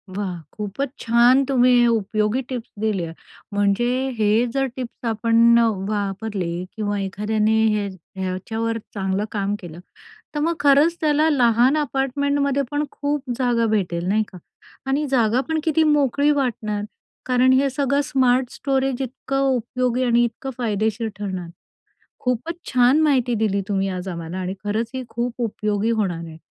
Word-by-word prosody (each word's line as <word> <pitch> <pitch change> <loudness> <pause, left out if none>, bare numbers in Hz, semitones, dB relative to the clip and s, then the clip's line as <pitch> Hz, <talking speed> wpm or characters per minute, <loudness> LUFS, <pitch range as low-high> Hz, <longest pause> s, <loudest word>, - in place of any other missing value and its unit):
वाह! 195 -3 -3 0.2
खूपच 210 +7 -3
छान 240 +4 +4
तुम्ही 250 -2 +4
उपयोगी 215 +1 +1
टिप्स 245 -3 -5
दिल्या. 195 -7 -1 0.4
म्हणजे 205 +4 +2 0.3
हे 215 +2 +3
जर 270 0 +1
टिप्स 250 -1 -7
आपण 230 +1 +4
अ, 235 - +4 0.2
वापरल्या 195 -4 -3
किंवा 205 -2 -2
एखाद्याने 210 +3 0 0.2
हे 205 -1 -1 0.3
ह्याच्यावर 220 +5 -2 0.2
चांगलं 195 0 -1
काम 200 -1 -1
केलं, 170 -2 -10 0.6
तर 295 - -1
मग 330 +3 +1
खरंच 290 +4 +4
त्याला 305 0 +3
लहान 245 0 +4
अपार्टमेंटमध्ये 280 0 0
पण 295 +1 0
खूप 285 -2 -3
जागा 240 -3 +2
भेटेल, 175 -4 -2
नाही 215 +3 +2
का? 180 - -10 0.5
आणि 285 +3 0
जागापण 260 +6 +1
किती 320 0 +2
मोकळी 290 -1 +3
वाटणार, 220 -7 -1 0.4
कारण 255 0 +4
हे 270 +1 +3
सगळं 280 +1 +1
स्मार्ट 255 -2 +2
स्टोरेज 270 -1 -1
इतकं 265 +1 -3 0.2
उपयोगी 250 +1 -1
आणि 240 -1 +3
इतकं 235 +3 -4
फायदेशीर 220 0 -1
ठरणार. 190 -4 -4 0.8
खूपच 250 +7 -1
छान 250 +4 +4
माहिती 260 -6 +2
दिली 200 -2 +1
तुम्ही 195 -1 0
आज 185 0 -4
आम्हाला 170 0 -5
आणि 185 0 -3
खरंच 220 +3 -1
ही 260 - -3
खूप 235 +1 -3
उपयोगी 210 -1 -1
होणार 190 -7 -1
आहे. 160 -1 -10
235 Hz, 145 wpm, -22 LUFS, 205-270 Hz, 0.8 s, छान